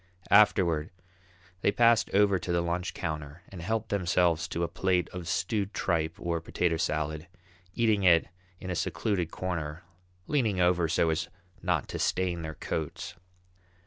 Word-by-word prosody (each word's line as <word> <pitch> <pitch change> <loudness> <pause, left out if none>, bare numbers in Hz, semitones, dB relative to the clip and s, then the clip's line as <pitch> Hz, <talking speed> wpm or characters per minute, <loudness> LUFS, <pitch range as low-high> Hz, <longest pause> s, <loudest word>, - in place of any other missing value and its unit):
Afterward 90 -7 +4 0.7
they - - +3
passed 115 0 +4
over 100 -1 +3
to 90 - -4
the 85 0 +2
lunch 85 +1 -2
counter 75 -1 -5
and 95 -3 -9
helped 110 +4 -2
themselves 90 -4 +1
to 85 - -2
a - - +1
plate 90 0 0
of 90 -2 -7
stewed 100 +3 -1
tripe 80 -2 0
or 85 -3 -2
potato 85 0 0
salad, 80 +1 -2 0.5
eating 110 -3 +2
it 85 -3 +5 0.3
in 95 - -5
a - - -1
secluded 90 -2 -1
corner, 85 -3 -4 0.4
leaning 115 -10 +1
over 90 -1 +3
so 80 0 +2
as 85 +2 -2 0.3
not - - 0
to - - -4
stain 90 -2 0
their 80 -1 -6
coats. 80 +2 -4
90 Hz, 150 wpm, -29 LUFS, 80-100 Hz, 0.7 s, it